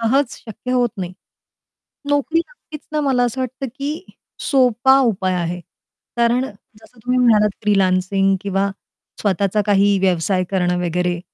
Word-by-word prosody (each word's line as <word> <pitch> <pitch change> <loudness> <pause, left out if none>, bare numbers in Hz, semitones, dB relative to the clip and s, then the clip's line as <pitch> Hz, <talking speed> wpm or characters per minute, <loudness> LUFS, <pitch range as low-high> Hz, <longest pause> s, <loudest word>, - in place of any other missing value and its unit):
सहज 265 +5 +2
शक्य 230 +3 -8
होत 245 -2 +2
नाही. 180 -1 -4 1.0
नोकरी 290 +3 +2
नक्कीच 335 - -9
ना, 305 - +1
मला 265 -4 +2
असं 245 +2 -1
वाटतं 255 +1 -4
की 300 +6 -5 0.2
सोपा 265 0 +3
उपाय 185 -2 -1
आहे. 175 0 -2 0.6
कारण 235 +2 +2 0.4
जसं 225 +2 -21
तुम्ही 250 +3 0
म्हणालात 210 -4 +4
फ्रीलान्सिंग 195 -1 +2
किंवा 200 -1 0 0.5
स्वतःचा 200 +1 +1
काही 200 0 +3
व्यवसाय 185 0 +1
करणं 180 -2 +1
वगैरे. 175 +1 -1
210 Hz, 130 wpm, -19 LUFS, 190-255 Hz, 1.0 s, म्हणालात